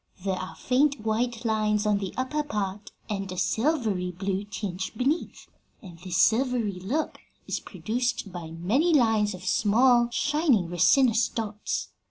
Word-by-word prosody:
There 195 Hz, -, +1 dB
are 185 Hz, 0 st, -5 dB
faint 275 Hz, +1 st, +1 dB
white 230 Hz, +2 st, -1 dB
lines 215 Hz, -1 st, +1 dB
on 210 Hz, -1 st, +2 dB
the 195 Hz, -2 st, -4 dB
upper 260 Hz, +4 st, -1 dB
part 205 Hz, -7 st, -4 dB, 0.2 s
and 195 Hz, -3 st, -4 dB
a 185 Hz, -, -6 dB
silvery 220 Hz, -, 0 dB
blue 190 Hz, +2 st, -3 dB
tinge 195 Hz, -1 st, -5 dB
beneath, 275 Hz, +8 st, -1 dB, 0.3 s
and 180 Hz, -7 st, -12 dB
this 180 Hz, 0 st, -3 dB
silvery 225 Hz, -2 st, +2 dB
look 255 Hz, -, -2 dB, 0.3 s
is -, -, -2 dB
produced 235 Hz, -3 st, -3 dB
by 170 Hz, -3 st, -6 dB
many 225 Hz, -, +1 dB
lines 220 Hz, -6 st, +3 dB
of 185 Hz, 0 st, -11 dB
small, 240 Hz, +5 st, +4 dB
shining 280 Hz, -, +1 dB
resinous 230 Hz, -, +4 dB
dots. 215 Hz, -2 st, -3 dB
215 Hz, 145 wpm, -26 LUFS, 190-250 Hz, 0.3 s, small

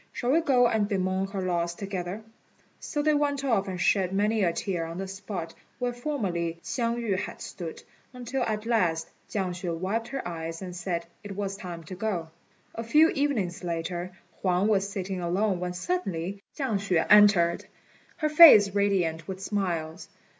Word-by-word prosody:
Shall 245 Hz, 0 st, -1 dB
we 325 Hz, +4 st, +4 dB
go 260 Hz, -6 st, +4 dB
and 220 Hz, -3 st, +1 dB
bemoan 190 Hz, -1 st, 0 dB
her 195 Hz, -1 st, -4 dB
loss 170 Hz, -1 st, -1 dB
together?" 195 Hz, +1 st, -5 dB, 0.6 s
So 295 Hz, -2 st, -3 dB
they 305 Hz, 0 st, +3 dB
went 285 Hz, -1 st, 0 dB
off 225 Hz, -7 st, +1 dB
and 185 Hz, -2 st, -4 dB
shed 190 Hz, -1 st, +2 dB
many 210 Hz, +3 st, +1 dB
a 170 Hz, -, +3 dB
tear 175 Hz, 0 st, -2 dB
on 165 Hz, +1 st, -7 dB
the 195 Hz, +1 st, -4 dB
spot 190 Hz, -3 st, -6 dB, 0.2 s
where 245 Hz, -1 st, -1 dB
formerly 195 Hz, -, -2 dB
Hsiang 235 Hz, -2 st, -1 dB
yü 220 Hz, -6 st, -1 dB
had -, -, -6 dB
stood, 170 Hz, -3 st, -7 dB, 0.3 s
until 250 Hz, +1 st, -4 dB
at 215 Hz, -2 st, -1 dB
last 180 Hz, -9 st, +1 dB, 0.2 s
Chiang 190 Hz, -3 st, -1 dB
hsüeh 175 Hz, -1 st, -4 dB
wiped 210 Hz, +6 st, -2 dB
her 270 Hz, -3 st, -4 dB
eyes 165 Hz, -1 st, -5 dB
and 180 Hz, -2 st, -7 dB
said 175 Hz, -1 st, -3 dB, 0.2 s
it 205 Hz, -1 st, -7 dB
was 195 Hz, -1 st, -3 dB
time 175 Hz, -4 st, -7 dB
to 160 Hz, -, -9 dB
go. 180 Hz, -4 st, -3 dB, 0.4 s
A 230 Hz, -, -5 dB
few 305 Hz, +8 st, +5 dB
evenings 235 Hz, -, -1 dB
later 175 Hz, +1 st, -3 dB, 0.3 s
Huang 185 Hz, +1 st, +2 dB
was 200 Hz, -2 st, +2 dB
sitting 190 Hz, -2 st, -4 dB
alone 185 Hz, +2 st, 0 dB
when 180 Hz, 0 st, -3 dB
suddenly 190 Hz, -, -3 dB, 0.2 s
Chiang 260 Hz, -9 st, 0 dB
hsüeh 185 Hz, -5 st, +1 dB
entered, 200 Hz, -5 st, +5 dB, 0.5 s
her 305 Hz, -, 0 dB
face 290 Hz, -, +9 dB
radiant 180 Hz, -6 st, +1 dB
with 190 Hz, -1 st, -5 dB
smiles. 180 Hz, -4 st, -3 dB
195 Hz, 175 wpm, -27 LUFS, 175-225 Hz, 0.6 s, face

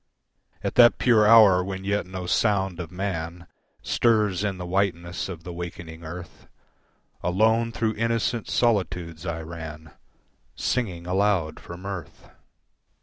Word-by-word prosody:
At -, -, -2 dB
that 120 Hz, -, +6 dB
pure 110 Hz, -4 st, +4 dB
hour 105 Hz, -5 st, +7 dB
when 95 Hz, 0 st, -5 dB
yet 100 Hz, -2 st, -1 dB
no 95 Hz, -1 st, -6 dB
sound 95 Hz, -2 st, +1 dB
of 85 Hz, -2 st, -5 dB
man, 90 Hz, -2 st, -4 dB, 0.4 s
Stirs 105 Hz, -5 st, +2 dB
in 100 Hz, -2 st, -1 dB
the 90 Hz, -, -6 dB
whiteness 90 Hz, -2 st, -1 dB
of 85 Hz, -3 st, -7 dB
the 90 Hz, 0 st, -7 dB
wakening 85 Hz, -1 st, -8 dB
earth, 85 Hz, +1 st, -9 dB, 0.7 s
Alone 110 Hz, +5 st, +2 dB
through 110 Hz, -1 st, -1 dB
innocent 115 Hz, +1 st, -1 dB
solitudes 90 Hz, -7 st, 0 dB
I 80 Hz, -1 st, -3 dB
ran 80 Hz, -1 st, -8 dB, 0.6 s
Singing 95 Hz, -9 st, -2 dB
aloud 90 Hz, -4 st, +1 dB
for 85 Hz, -, -9 dB
mirth. 95 Hz, -1 st, -8 dB
95 Hz, 130 wpm, -25 LUFS, 85-105 Hz, 0.7 s, hour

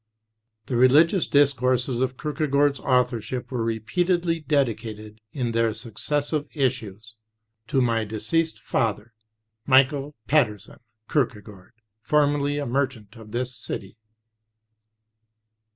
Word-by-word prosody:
The 125 Hz, -, -3 dB
religious 150 Hz, -, +5 dB
discourses 130 Hz, -3 st, +2 dB
of 130 Hz, 0 st, -1 dB
Kierkegaard's 145 Hz, -2 st, +1 dB
authorship 125 Hz, -1 st, 0 dB
were 120 Hz, -3 st, -1 dB
repeatedly 165 Hz, -, 0 dB
dedicated 110 Hz, -7 st, -2 dB
in 125 Hz, -3 st, -2 dB
their 115 Hz, -1 st, +1 dB
successive 145 Hz, +6 st, -2 dB
issues 110 Hz, -6 st, -3 dB, 0.5 s
to 135 Hz, -, +1 dB
"my 115 Hz, -2 st, +1 dB
deceased 110 Hz, +10 st, -2 dB
father, 110 Hz, -1 st, -1 dB, 0.5 s
Michael 140 Hz, +2 st, +3 dB
Pedersen 120 Hz, -9 st, 0 dB, 0.3 s
Kierkegaard, 105 Hz, -8 st, -3 dB, 0.3 s
formerly 145 Hz, 0 st, +1 dB
a 145 Hz, -, -2 dB
merchant 125 Hz, -6 st, -2 dB
of 110 Hz, -2 st, -12 dB
this 125 Hz, +3 st, -3 dB
city." 100 Hz, -3 st, -7 dB
130 Hz, 100 wpm, -24 LUFS, 115-145 Hz, 0.5 s, religious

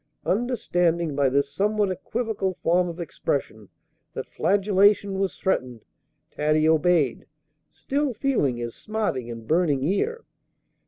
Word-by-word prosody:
Understanding, 175 Hz, -, 0 dB
by 140 Hz, -2 st, +3 dB
this 140 Hz, +1 st, 0 dB
somewhat 210 Hz, 0 st, +1 dB
equivocal 195 Hz, 0 st, -2 dB
form 175 Hz, +1 st, +2 dB
of 170 Hz, +1 st, -8 dB
expression, 135 Hz, -, -3 dB, 0.5 s
that -, -, -4 dB
flagellation 200 Hz, 0 st, +2 dB
was 195 Hz, -1 st, -1 dB
threatened, 125 Hz, -, -2 dB, 0.5 s
Taddy 155 Hz, +1 st, +2 dB
obeyed, 160 Hz, -4 st, +2 dB, 0.4 s
still 270 Hz, -, -2 dB
feeling 220 Hz, -, 0 dB
his 120 Hz, -1 st, -5 dB
smarting 210 Hz, -, -3 dB
and 115 Hz, -1 st, -7 dB
burning 155 Hz, -5 st, +2 dB
ear. 425 Hz, -, -1 dB
175 Hz, 115 wpm, -25 LUFS, 140-205 Hz, 0.5 s, by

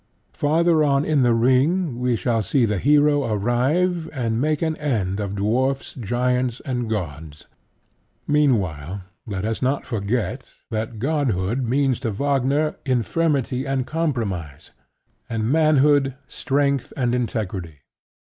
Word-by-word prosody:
Farther 160 Hz, +2 st, +2 dB
on 140 Hz, 0 st, +2 dB
in 150 Hz, -3 st, +2 dB
The 120 Hz, -2 st, +4 dB
Ring 130 Hz, +5 st, +2 dB
we 125 Hz, -1 st, +1 dB
shall 115 Hz, +2 st, 0 dB
see 120 Hz, +5 st, +2 dB
the 105 Hz, -3 st, -1 dB
Hero 145 Hz, +2 st, +4 dB
arrive 135 Hz, -, 0 dB
and 115 Hz, -4 st, -1 dB
make 155 Hz, +2 st, 0 dB
an 160 Hz, -1 st, 0 dB
end 105 Hz, -10 st, -1 dB
of 100 Hz, -1 st, -3 dB
dwarfs, 130 Hz, +7 st, 0 dB
giants, 125 Hz, +1 st, -1 dB
and 125 Hz, -4 st, -2 dB
gods. 80 Hz, -7 st, -5 dB, 0.8 s
Meanwhile, 100 Hz, -, 0 dB, 0.2 s
let 100 Hz, -2 st, -3 dB
us 110 Hz, 0 st, -2 dB
not 135 Hz, +2 st, 0 dB
forget 115 Hz, +3 st, -2 dB, 0.3 s
that 110 Hz, 0 st, -3 dB
godhood 125 Hz, -, 0 dB
means 130 Hz, 0 st, +1 dB
to 125 Hz, -3 st, -2 dB
Wagner 140 Hz, +6 st, 0 dB
infirmity 135 Hz, 0 st, 0 dB
and 135 Hz, -2 st, -1 dB
compromise, 110 Hz, -, -3 dB, 0.6 s
and 115 Hz, +1 st, -1 dB
manhood 145 Hz, -3 st, +3 dB
strength 140 Hz, -1 st, 0 dB
and 125 Hz, -3 st, +1 dB
integrity. 95 Hz, -, -3 dB
125 Hz, 125 wpm, -22 LUFS, 110-145 Hz, 0.8 s, The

